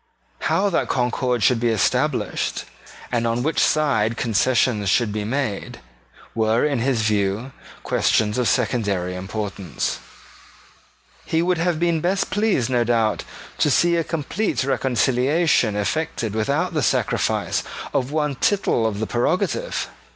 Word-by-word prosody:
How 200 Hz, +1 st, +1 dB
that -, -, 0 dB
concord 125 Hz, -1 st, 0 dB
should 120 Hz, +4 st, +4 dB
be 120 Hz, 0 st, +1 dB
established, 110 Hz, -4 st, 0 dB, 0.5 s
and 120 Hz, -1 st, 0 dB
on 115 Hz, +1 st, 0 dB
which 160 Hz, +3 st, 0 dB
side 115 Hz, -8 st, +2 dB
concessions 115 Hz, -2 st, +1 dB
should 115 Hz, 0 st, +2 dB
be 105 Hz, -1 st, -2 dB
made, 120 Hz, -2 st, -3 dB, 0.5 s
were, 110 Hz, +2 st, +2 dB
in 140 Hz, -4 st, 0 dB
his 120 Hz, -2 st, +1 dB
view, 105 Hz, +3 st, 0 dB, 0.3 s
questions 105 Hz, +2 st, +1 dB
of 125 Hz, -, +1 dB
secondary 100 Hz, -7 st, 0 dB
importance. 95 Hz, -2 st, -4 dB, 1.2 s
He 165 Hz, +1 st, 0 dB
would 180 Hz, -1 st, +1 dB
have 170 Hz, -1 st, 0 dB
been 170 Hz, -2 st, +1 dB
best 190 Hz, +4 st, 0 dB
pleased, 205 Hz, -, +1 dB
no 125 Hz, -2 st, +1 dB
doubt, 115 Hz, -2 st, +1 dB, 0.3 s
to -, -, +3 dB
see 170 Hz, +4 st, +3 dB
a 165 Hz, -, +1 dB
complete 165 Hz, +4 st, -2 dB
reconciliation 130 Hz, -1 st, +2 dB
effected 110 Hz, 0 st, -2 dB
without 110 Hz, 0 st, 0 dB
the -, -, 0 dB
sacrifice -, -, 0 dB, 0.3 s
of 130 Hz, +2 st, 0 dB
one 150 Hz, -1 st, 0 dB
tittle 135 Hz, -, +1 dB
of 105 Hz, -2 st, -3 dB
the 110 Hz, -, -1 dB
prerogative. 185 Hz, -, -1 dB
125 Hz, 135 wpm, -22 LUFS, 110-155 Hz, 1.2 s, should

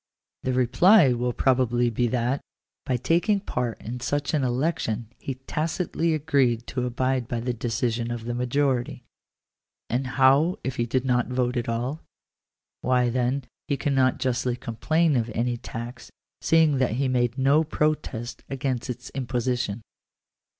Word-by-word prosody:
The 130 Hz, -, -1 dB
reply 135 Hz, -, +5 dB
will 120 Hz, +1 st, -1 dB
probably 120 Hz, -2 st, +2 dB
be 120 Hz, +2 st, +1 dB
that, 125 Hz, +3 st, 0 dB, 0.5 s
by 130 Hz, -2 st, +1 dB
taking 175 Hz, -, +2 dB
part 125 Hz, -, -3 dB
in 120 Hz, +3 st, -5 dB
such 145 Hz, +5 st, -1 dB
an 150 Hz, -3 st, +2 dB
election, 120 Hz, -4 st, -1 dB
he 135 Hz, -, -4 dB
tacitly 160 Hz, +4 st, -1 dB
agreed 135 Hz, -6 st, +1 dB
to 125 Hz, -1 st, -2 dB
abide 130 Hz, 0 st, 0 dB
by 120 Hz, -, -2 dB
the 125 Hz, +1 st, -2 dB
decision 115 Hz, 0 st, -1 dB
of 120 Hz, -1 st, -4 dB
the 120 Hz, -, -2 dB
majority. 125 Hz, +1 st, 0 dB, 0.9 s
And 125 Hz, +3 st, 0 dB
how 140 Hz, +6 st, +5 dB
if 130 Hz, 0 st, -3 dB
he 120 Hz, -, 0 dB
did 130 Hz, +2 st, 0 dB
not 125 Hz, -2 st, +2 dB
vote 125 Hz, -1 st, 0 dB
at 120 Hz, -1 st, -1 dB
all? 125 Hz, +7 st, -2 dB, 0.8 s
Why 125 Hz, -1 st, +2 dB
then 130 Hz, +2 st, 0 dB, 0.2 s
he 140 Hz, -, 0 dB
cannot 135 Hz, -3 st, +2 dB
justly 125 Hz, -1 st, 0 dB
complain 150 Hz, +7 st, +1 dB
of 120 Hz, -1 st, 0 dB
any 120 Hz, +1 st, 0 dB
tax, 120 Hz, 0 st, -7 dB, 0.3 s
seeing 160 Hz, -4 st, +4 dB
that 130 Hz, -4 st, +1 dB
he 135 Hz, +3 st, 0 dB
made 120 Hz, -1 st, +1 dB
no 140 Hz, +4 st, +4 dB
protest 150 Hz, -6 st, -2 dB
against 130 Hz, -3 st, -2 dB
its 125 Hz, +1 st, -6 dB
imposition. 120 Hz, -4 st, -2 dB
125 Hz, 150 wpm, -25 LUFS, 120-140 Hz, 0.9 s, reply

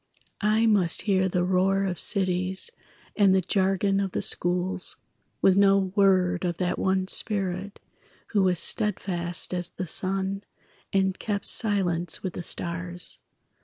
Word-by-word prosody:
I 220 Hz, +2 st, +2 dB
must 200 Hz, -6 st, +2 dB
hear 190 Hz, -2 st, +1 dB
the 175 Hz, 0 st, 0 dB
roar 190 Hz, +2 st, +1 dB
of 180 Hz, -3 st, -3 dB
cities 185 Hz, -, 0 dB, 0.4 s
And 200 Hz, -3 st, +4 dB
the 190 Hz, -, +3 dB
jargon 195 Hz, +1 st, 0 dB
of 195 Hz, -2 st, -3 dB
the -, -, -2 dB
schools, 180 Hz, +2 st, +2 dB, 0.5 s
With 190 Hz, -, +5 dB
no 195 Hz, 0 st, +4 dB, 0.2 s
word 185 Hz, -3 st, +2 dB
of 175 Hz, -2 st, -2 dB
that 180 Hz, -1 st, -2 dB
one 190 Hz, 0 st, 0 dB
spirit 195 Hz, -1 st, 0 dB, 0.5 s
Who 205 Hz, -, +1 dB
was 185 Hz, -2 st, +2 dB
steadfast 180 Hz, -4 st, -1 dB
as 175 Hz, -1 st, -1 dB
the 185 Hz, -, -6 dB
sun 195 Hz, +3 st, -1 dB, 0.5 s
And 190 Hz, -1 st, 0 dB
kept 205 Hz, -2 st, -3 dB
silence 180 Hz, -6 st, +1 dB
with 185 Hz, -3 st, -4 dB
the -, -, -6 dB
stars. 175 Hz, +1 st, -4 dB
190 Hz, 140 wpm, -25 LUFS, 180-195 Hz, 0.5 s, With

